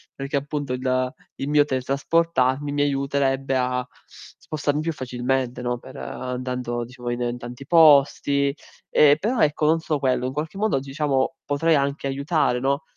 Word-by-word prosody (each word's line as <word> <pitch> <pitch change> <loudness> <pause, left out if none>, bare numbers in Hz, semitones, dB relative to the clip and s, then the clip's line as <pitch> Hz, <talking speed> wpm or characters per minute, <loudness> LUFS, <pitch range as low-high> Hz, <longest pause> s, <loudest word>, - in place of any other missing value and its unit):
perché 140 +1 -2
appunto 145 -1 -3
il 130 0 -1 0.2
il 135 - -4
mio 150 0 +4
teletrasportarmi 140 +1 0
mi 145 0 0
aiuterebbe 135 -1 0
a 125 0 0 0.5
spostarmi 150 -1 -2
più 165 +1 -1
facilmente, 125 -1 -2
no, 120 0 -1
per 130 +3 -12
andando 125 -2 -4
diciamo 125 0 -7
in 120 0 -2
in 120 0 -2
tanti 120 +2 -9
posti. 140 -3 +4 0.4
Ehm, 145 -1 +6
però, 225 +9 -1
ecco, 150 0 +2
non 160 +2 +3
solo 155 -2 -1
quello, 130 -2 +1
in - - -3
qualche 155 +7 -4
modo 210 -9 +1
diciamo 135 +1 -1
potrei 155 +3 +2
anche 140 0 -1
aiutare, 140 -2 0
no, 140 +3 0
135 Hz, 155 wpm, -23 LUFS, 130-145 Hz, 0.5 s, Ehm